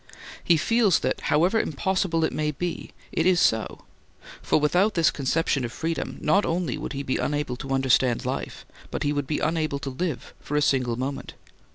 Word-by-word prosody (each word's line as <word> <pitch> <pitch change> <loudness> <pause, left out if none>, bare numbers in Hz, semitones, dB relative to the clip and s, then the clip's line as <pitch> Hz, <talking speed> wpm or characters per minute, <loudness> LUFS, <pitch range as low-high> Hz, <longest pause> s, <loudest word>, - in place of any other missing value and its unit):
He 170 - +4
feels 215 +3 +3
that - - -1
however 180 +8 +3
impossible 175 +1 0
it 160 - 0
may 150 0 -1
be, 170 +3 -4 0.2
it 165 - +1
is 185 -2 +4
so, 110 -8 +1 0.6
for - - +2
without 180 +8 +2
this 165 -2 +4
conception 140 0 0
of 120 - -3
freedom 165 +4 -3
not 195 +7 +3
only 165 -6 -1
would - - -5
he 140 0 -4
be 130 - -1
unable 145 -4 -1
to 135 - -8
understand 130 -2 +2
life, - - -4 0.2
but - - -3
he 145 - +1
would 145 -2 -2
be 150 - -1
unable 155 -2 0
to 140 -1 -5
live 150 0 -4
for 150 - -5
a - - +4
single 125 -4 +1
moment. 135 +3 -5
150 Hz, 190 wpm, -25 LUFS, 135-170 Hz, 0.6 s, He